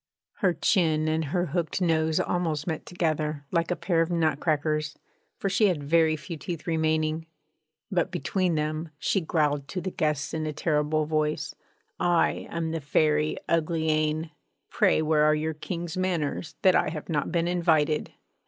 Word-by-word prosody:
Her 180 -3 +2
chin 155 -2 +2
and 160 0 0
her 175 +5 0
hooked 170 +2 -2
nose 160 -3 +2
almost 160 -4 -1
met 160 -3 -4
together, 155 -4 -1
like 170 -1 +1
a 180 - +1
pair 170 -3 +1
of 165 - 0
nut 160 -4 +1
crackers, 155 -1 0 0.4
for - - -2
she 205 +2 +3
had 170 -7 -1
very 160 +1 +3
few 155 +2 -7
teeth 170 +1 -6
remaining; 160 -1 0 0.6
but 175 -3 +1
between 180 +4 0
them 155 +1 -2
she 190 +5 0
growled 150 -4 0
to 185 - -4
the 185 +1 -4
guests 150 -6 -1
in 155 -1 -2
a 155 - -3
terrible 155 0 +1
voice: 155 0 -1 0.5
'I 175 -1 +2
am 165 -1 -2
the 165 -1 -3
Fairy 150 +1 +1
Uglyane! 160 -1 0 0.4
Pray 155 - +3
where 155 -1 +3
are 155 0 +4
your 155 +1 -1
King's 170 +1 -5
manners, 170 -4 -2
that 185 - +6
I - - +2
have 155 -1 -6
not 150 -4 -1
been 170 -1 +1
invited?' 160 -4 +1
160 Hz, 165 wpm, -27 LUFS, 155-170 Hz, 0.6 s, that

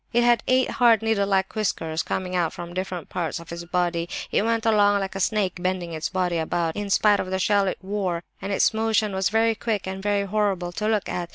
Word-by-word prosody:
It 240 +1 +4
had 240 -2 +4
eight 255 0 +3
hard 235 -3 +4
needle 220 -3 +1
like 190 -1 +1
whiskers 165 -7 -1
coming 185 -1 -3
out 170 -3 0
from 175 0 -8
different 185 -2 -4
parts 170 -3 -3
of 170 0 -12
its 170 0 -6
body; 175 -1 -1 0.2
it - - +2
went 230 0 0
along 205 -2 +4
like 195 -1 -3
a 195 - -5
snake, 195 -2 0
bending 180 -2 -2
its 155 -1 -3
body 180 -2 0
about 165 0 -1
in 205 -1 -4
spite 205 +1 +4
of 185 - -3
the 190 - -1
shell 200 +2 +2
it 185 - -2
wore, 190 -4 -2 0.2
and 195 +2 -4
its 195 - +3
motion 220 -1 +1
was 190 0 +1
very 225 +1 +3
quick 220 -2 -2
and 190 0 -5
very 205 0 +1
horrible 195 -3 0
to 210 +4 -3
look 215 -2 +1
at. 175 -1 -3
195 Hz, 235 wpm, -24 LUFS, 175-215 Hz, 0.2 s, It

